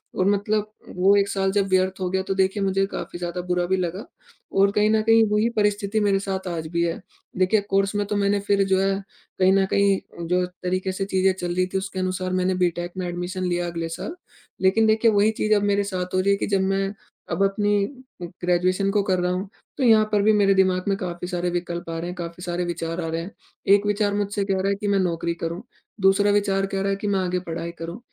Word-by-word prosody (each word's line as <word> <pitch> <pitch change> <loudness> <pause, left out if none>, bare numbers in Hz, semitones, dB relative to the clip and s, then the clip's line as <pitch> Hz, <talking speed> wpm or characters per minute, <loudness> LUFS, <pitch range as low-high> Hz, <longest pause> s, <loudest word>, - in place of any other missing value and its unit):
और 185 - +1
मतलब 210 +1 0 0.2
वो 190 +3 +4
एक 200 0 +2
साल 195 -1 0
जब 200 0 +1
व्यर्थ 185 0 +1
हो 180 - 0
गया 190 0 0
तो 195 - -2
देखिए 195 +1 +1
मुझे 195 0 +1
काफ़ी 175 - -6
ज़्यादा 175 0 -3
बुरा 180 0 +1
भी 190 +1 +1
लगा 185 +4 -3 0.5
और 200 0 +5
कहीं 210 +1 +2
न 220 0 +3
कहीं 225 0 +5
वही 215 +3 +2
परिस्थिति 205 0 +1
मेरे 200 -2 +2
साथ 190 -1 -4
आज 160 -2 -4
भी 170 0 +1
है। 170 -1 -2 0.4
देखिए 190 +3 +3
कोर्स 195 +1 +1
में 205 0 0
तो 210 - -2
मैंने 200 0 +2
फिर 200 -1 +3
जो 190 -1 +2
है 195 0 +1 0.4
कहीं 185 0 +5
न 195 -1 +3
कहीं 200 -1 +3 0.3
जो 180 +1 +1
तरीके 185 +1 -3
से 195 +1 -3
चीजें 190 -1 +2
चल 175 0 -3
रही 185 0 +2
थी 190 - +1
उसके 190 0 -4
अनुसार 185 0 -2
मैंने 185 0 +1
बी 180 -1 +2
टेक 175 0 -4
में 185 -1 -2
एडमिशन 175 +1 -4
लिया 175 -1 -1
अगले 165 -1 -4
साल। 320 - -6 0.5
लेकिन 190 +4 +4
देखिए 220 +1 +4
वही 210 +1 +3
चीज़ 215 - +2
अब 205 - +1
मेरे 200 0 +2
साथ 185 -2 -4
हो - - +3
रही 200 +2 +2
है 200 - +3
कि - - -2
जब 195 -2 +1
मैं 195 +1 0 0.4
अब 195 - +1
अपनी 205 0 +2 0.4
ग्रेजुएशन 180 +2 0
को 205 0 +2
कर 185 -2 +1
रहा 180 0 0
हूँ 190 +2 -3 0.3
तो 270 - -1
यहाँ 220 -3 +6
पर 205 -1 +3
भी 215 +1 +4
मेरे 200 -2 +4
दिमाग 185 -1 +2
में 195 - +1
काफ़ी 180 -1 -5
सारे 175 0 -2
विकल्प 175 -1 -4
आ 165 - -3
रहे 170 - -4
हैं, 180 - -5
काफ़ी 170 0 -7
सारे 175 0 -2
विचार 165 0 -3
आ 165 - -3
रहे 165 +1 -2
हैं। 185 +5 -8 0.4
एक 205 0 -1
विचार 205 0 +1
मुझसे 205 0 -1
कह 195 -1 0
रहा 195 - 0
है 200 - +1
कि 205 +1 -4
मैं 200 -1 +2
नौकरी 170 -2 -1
करूँ। 170 +3 -3 0.4
दूसरा 195 +2 +4
विचार 195 -1 +1
कह 195 0 -3
रहा 195 - 0
है 195 - +1
कि 200 +1 -5
मैं 200 -1 +1
आगे 180 -1 -1
पढ़ाई 170 -1 -5
करूँ। 170 +6 -6
190 Hz, 245 wpm, -23 LUFS, 180-200 Hz, 0.5 s, यहाँ